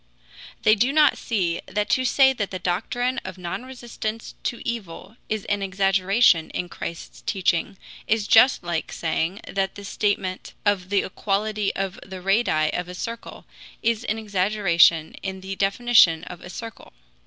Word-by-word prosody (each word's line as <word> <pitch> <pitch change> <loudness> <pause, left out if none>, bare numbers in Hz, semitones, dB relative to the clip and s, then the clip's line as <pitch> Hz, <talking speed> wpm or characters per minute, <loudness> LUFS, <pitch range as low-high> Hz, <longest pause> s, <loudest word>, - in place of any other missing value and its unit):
They 215 - +6
do 240 +5 +2
not 300 -1 +4
see 180 -7 -1
that 205 +2 -1
to 260 - +2
say 265 +1 +5
that 205 -6 -3
the 185 - -4
doctrine 225 +8 -1
of 190 -1 -7
non 180 +7 -5
resistance 235 -3 -6
to 240 - -4
evil 205 -3 -6
is 215 -2 -2
an 205 -1 -1
exaggeration 195 -1 +3
in 175 - -4
Christ's 170 -1 -7
teaching 190 0 0 0.3
is 215 -1 +1
just 240 -1 +6
like 170 -2 -3
saying 165 +4 -2
that 195 -1 -2
the 200 - -9
statement 200 -2 -2
of 195 -3 +1
the 200 -1 +2
equality 210 +1 -1
of 195 -1 -3
the 190 -1 -8
radii 185 -5 +2
of 180 0 -2
a 180 - -7
circle 230 +5 -7 0.4
is 230 0 +1
an 220 - -1
exaggeration 190 -6 +3
in 190 -1 -5
the 190 +1 -5
definition 195 -4 +4
of 180 0 -9
a - - -10
circle. 225 +3 -9
195 Hz, 160 wpm, -24 LUFS, 180-225 Hz, 0.4 s, They